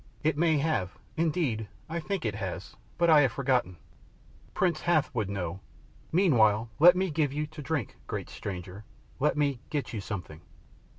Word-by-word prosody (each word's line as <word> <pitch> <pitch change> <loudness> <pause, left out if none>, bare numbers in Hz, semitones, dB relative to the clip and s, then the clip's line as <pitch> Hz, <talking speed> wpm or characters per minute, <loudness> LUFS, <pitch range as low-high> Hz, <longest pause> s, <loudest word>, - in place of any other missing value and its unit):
"It 155 -1 +2
may 160 0 +3
have; 140 - -1 0.2
indeed 155 -10 0 0.2
I 170 +1 -3
think 185 -1 -3
it 110 - 0
has, 100 - -5 0.2
but 170 - +3
I 155 -3 +7
have 135 -5 +2
forgotten. 125 -9 0 0.8
Prince 170 -4 +1
Hath 155 -4 +2
would 110 -6 -1
know! 95 -2 -3 0.5
Meanwhile 115 - +4
let 175 +3 +9
me 185 -1 0
give 150 -2 +1
you 150 +2 -2
to 155 0 -10
drink, 145 -6 -3
great - - -4
stranger, 95 +1 -7 0.4
let 150 +2 +2
me 140 -4 +1
get 145 -4 -3
you 110 - -3
something." 90 -6 -6
145 Hz, 165 wpm, -29 LUFS, 105-160 Hz, 0.8 s, let